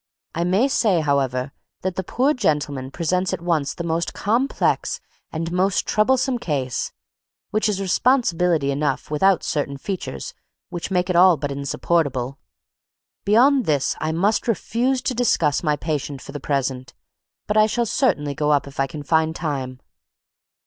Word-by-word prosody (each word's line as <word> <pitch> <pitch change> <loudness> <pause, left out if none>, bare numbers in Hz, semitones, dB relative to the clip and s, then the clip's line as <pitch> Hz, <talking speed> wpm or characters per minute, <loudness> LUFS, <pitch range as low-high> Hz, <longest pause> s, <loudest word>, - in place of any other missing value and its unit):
I 170 - -1
may 195 +9 +3
say, 210 -10 +2
however, 135 -2 0 0.3
that 185 -1 -2
that 190 - -4
poor 270 +4 +2
gentleman 145 - -1
presents 180 +5 -1
at - - -3
once 160 -5 0
the 170 - -4
most 165 0 -2
complex 235 +7 0 0.3
and 165 +1 -3
most 185 +2 +1
troublesome 250 +3 +2
case, 135 - -2 0.6
which 215 0 +1
is 200 -2 -1
responsibility 180 - +2
enough 145 +1 -2
without 190 +4 +3
certain 140 -2 -2
features 135 - -5 0.4
which 175 - -5
make 180 -1 +1
it - - -2
all 180 -1 +6
but 145 0 -3
insupportable. 140 -2 -1 0.9
Beyond 255 +6 +4
this 145 -3 +1
I 155 - -1
must 200 +9 +1
refuse 245 +4 0
to 260 - 0
discuss 190 - +2
my 150 -3 +1
patient 145 -3 -3
for - - -9
the 145 - -6
present; 135 -2 -2 0.5
but 210 - -2
I 215 0 +6
shall 235 +2 0
certainly 150 - +1
go 150 +1 -1
up 145 -1 +3
if 140 0 -11
I 135 - +2
can 150 +2 -7
find 160 +1 +1
time." 130 -6 -4
165 Hz, 155 wpm, -22 LUFS, 145-205 Hz, 0.9 s, all